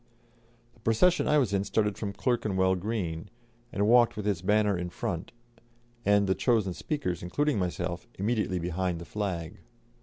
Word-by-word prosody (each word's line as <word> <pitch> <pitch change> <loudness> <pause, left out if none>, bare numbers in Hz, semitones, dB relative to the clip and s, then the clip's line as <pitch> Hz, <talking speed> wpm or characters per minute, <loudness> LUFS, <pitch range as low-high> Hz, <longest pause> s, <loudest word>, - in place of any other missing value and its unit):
The - - -25
procession 115 +12 +3
I 150 - +4
was 125 -8 +2
in 100 -1 +2
started 105 0 0
from 100 -2 -4
Clerkenwell 100 -5 +1
Green, 90 -3 -3 0.4
and 100 +1 +1
walked 120 -1 +5
with 105 - -4
its 100 -5 0
banner 105 +1 +3
in 90 0 -3
front, 85 0 -4 0.7
and 100 0 +4
the 95 - +2
chosen 110 -5 +1
speakers, 140 - -3
including 145 +7 0
myself, 90 -1 -3
immediately 105 -2 0
behind 90 +1 -1
the 85 - -8
flag. 90 -6 -4
100 Hz, 155 wpm, -29 LUFS, 90-110 Hz, 0.7 s, walked